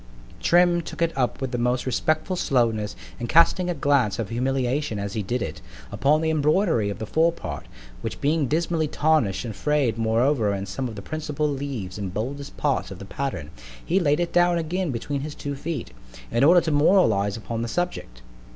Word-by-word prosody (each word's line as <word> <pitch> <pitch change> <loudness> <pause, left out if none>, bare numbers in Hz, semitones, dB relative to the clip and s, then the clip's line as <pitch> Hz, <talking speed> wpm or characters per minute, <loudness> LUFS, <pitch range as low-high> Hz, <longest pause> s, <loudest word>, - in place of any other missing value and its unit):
Trim_ 175 0 +4
took - - -8
it 165 - 0
up 125 -3 0
with 130 -2 -2
the 120 - -2
most 125 +1 0
respectful 155 +7 0
slowness, 115 -9 +1 0.2
and 120 -1 -4
casting 175 +3 +4
a 175 - -1
glance 140 -7 +2
of 115 -3 -3
humiliation 130 +1 -1
as 100 0 -4
he 110 - -1
did 120 +3 -2
it, - - -6 0.3
upon 150 +3 +2
the 160 0 +1
embroidery 155 - +2
of 100 - -4
the 110 - -5
fore 165 +8 +3
part, 70 - -7 0.3
which - - -5
being 150 0 +1
dismally 160 +2 0
tarnish'd 150 -10 +1
and 110 -3 -5
fray'd 140 -5 +1
moreover 115 -1 +2
in 100 0 -4
some 130 +5 -3
of 115 - -7
the 100 - -8
principal 150 +1 -2
leaves 135 -10 -4
and 95 -2 -5
boldest 140 +6 -4
parts 140 -8 0
of 95 - -8
the 100 - -9
pattern, 95 - -4 0.3
he 185 +4 +2
lay'd 150 -3 +2
it 175 -1 -1
down 175 0 +4
again 170 +2 -1
between 140 +3 -3
his 150 +1 -6
two 145 0 -4
feet, 145 -1 -5 0.4
in 120 - +2
order 175 +4 +7
to 160 - -2
moralize 130 - +3
upon 115 0 -4
the 115 - -2
subject. 145 - -3
140 Hz, 195 wpm, -24 LUFS, 115-160 Hz, 0.4 s, order